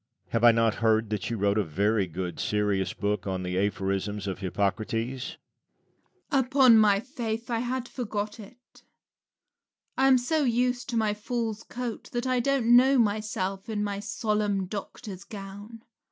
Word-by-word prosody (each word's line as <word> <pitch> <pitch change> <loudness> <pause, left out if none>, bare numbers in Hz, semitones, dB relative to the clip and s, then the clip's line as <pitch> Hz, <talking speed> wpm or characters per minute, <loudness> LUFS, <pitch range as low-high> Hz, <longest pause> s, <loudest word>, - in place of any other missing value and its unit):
Lucian. - - -35
Have 115 0 0
I 120 - +9
not 115 -1 +2
heard 110 -1 +2
that 105 -2 -2
you 115 - -2
wrote 100 +1 +2
a - - +2
very 100 +5 +1
good 90 +1 -5
serious 100 -3 0
book 100 -2 -2
on 95 -1 -2
the 90 0 -3
aphorisms 100 0 -1
of 95 -2 -4
Hippocrates? 110 +6 -2 0.9
Rabelais. 275 - +4
Upon 255 -4 +6
my 205 -2 +5
faith 235 -1 -4
I 230 - +1
had 245 +1 -2
forgot 210 -3 -4
it. 245 +4 -15 1.1
I 265 - +3
am 265 -1 +6
so 300 +5 0
used 245 +1 0
to 235 - -1
my 215 -2 +2
fool's 225 0 -3
coat 245 -1 -6
that 240 +1 -1
I 255 -1 +1
don't 240 -2 +3
know 265 +2 +6
myself 205 -3 -1
in 210 -1 -1
my 200 -1 -2
solemn 205 -1 -1
doctor's 200 0 -7
gown. 205 +2 -9
205 Hz, 165 wpm, -27 LUFS, -, 1.1 s, I